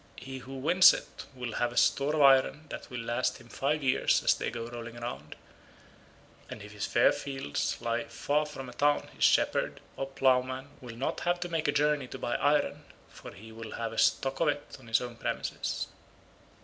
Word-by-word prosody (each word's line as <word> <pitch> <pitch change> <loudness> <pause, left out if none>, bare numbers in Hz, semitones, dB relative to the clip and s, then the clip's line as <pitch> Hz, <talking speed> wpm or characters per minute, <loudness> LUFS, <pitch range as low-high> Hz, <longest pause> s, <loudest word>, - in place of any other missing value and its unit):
He 130 0 -7
who 130 +2 -9
wins 170 +7 +7
it - - -9
will 125 -2 -5
have 120 0 +1
a 120 - -9
store 145 +2 +3
of 150 - +4
iron 135 +2 +5
that - - -7
will 125 -2 -5
last 120 +2 -1
him 120 - -16
five 145 +4 -1
years 130 - +2
as - - +5
they - - -3
go 115 -1 -5
rolling 120 0 -8
round, 75 - -6 1.1
and - - -8
if - - -11
his - - -4
fair - - +4
fields 135 - -3
lie 115 0 -1
far 150 +1 -1
from 135 -3 -8
a 125 - -9
town 145 +3 +1
his - - -4
shepherd - - +3 0.2
or 135 - -3
ploughman 130 0 +1
will 120 -3 -9
not 130 +4 -2
have 175 0 0
to 175 - -3
make 165 -3 -1
a - - +4
journey 145 -2 +1
to 130 - -8
buy 120 - -2
iron, 145 0 +1 0.3
for - - -11
he 110 +3 -12
will 115 0 -8
have 115 -1 -4
a - - -2
stock 135 0 +2
of 165 - +2
it 145 -1 -2
on 125 - -16
his 115 - +2
own 120 -1 -7
premises." - - -3
130 Hz, 205 wpm, -30 LUFS, 120-145 Hz, 1.1 s, wins